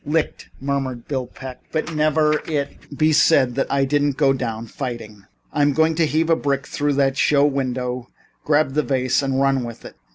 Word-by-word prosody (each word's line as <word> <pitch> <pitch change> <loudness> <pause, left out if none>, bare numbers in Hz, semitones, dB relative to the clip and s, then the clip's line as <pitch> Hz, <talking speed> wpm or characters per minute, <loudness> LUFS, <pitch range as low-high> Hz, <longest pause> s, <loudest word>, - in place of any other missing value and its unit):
"Licked," 155 +1 -2
murmured 135 -3 -3
Bill 130 -3 -2
Peck, 130 0 -10
"but 160 +1 -2
never 155 0 +2
let 150 - -3
it 145 -1 -4
be 155 0 +3
said 140 -5 +4
that 135 - -2
I 140 0 +2
didn't 145 0 +1
go 140 -2 +4
down 115 -4 -4
fighting. 115 -5 -7 0.3
I'm 145 -1 +2
going 160 +2 +3
to 160 0 +1
heave 160 +2 +1
a - - +6
brick 140 -3 -1
through 145 0 -1
that 135 -1 +1
show 145 0 +4
window, 125 -3 -2 0.3
grab 150 -2 +2
the 150 - +2
vase 130 -2 +1
and 135 -1 -1
run 135 -2 +2
with 115 -1 -8
it." - - -10
140 Hz, 195 wpm, -21 LUFS, 130-150 Hz, 0.3 s, a